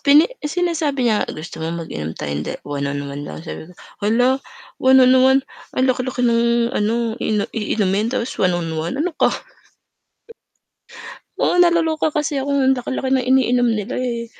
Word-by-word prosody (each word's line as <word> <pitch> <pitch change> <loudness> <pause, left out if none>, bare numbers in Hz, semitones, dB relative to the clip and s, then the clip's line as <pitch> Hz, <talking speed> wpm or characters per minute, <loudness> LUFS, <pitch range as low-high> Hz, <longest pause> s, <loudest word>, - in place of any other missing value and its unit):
Pini 290 +3 +6 0.2
sinasabi 310 -4 -1
niya 220 -3 +1
"Gusto 160 +1 -7
mo 165 +1 -3
mag-inom 80 - -6
tayong 70 0 -3
da - - -4
1 140 -1 -3
on 140 0 -3
1 140 0 -6
lang?" 150 +2 -8
sabi 160 -1 -8
ko 180 - -17 0.2
"Hala, 245 +6 +2 0.4
1 260 0 +5
on 255 - +5
1 260 +1 +5 0.4
ang 255 - +3
laki-laki 255 -1 0
ng 235 +1 +2
ano, 230 +1 0
i - - -2 0.2
iinumin 210 -1 0
tapos 245 0 -3
1 180 -2 +2
on 165 -2 -3
1 165 +11 -3
ano 330 +5 -1
ka?" - - +5 2.1
Oo, 355 - +3
naloloka 330 -3 +2
kasi 295 -2 -1
ako 275 - -4
ang 270 -1 +3
laki-laki 260 +1 -2
ng 260 -2 +1
iniinom 250 -2 +3
nila, 210 +5 -4
eh, 235 -2 -2
245 Hz, 165 wpm, -20 LUFS, 185-270 Hz, 2.1 s, Pini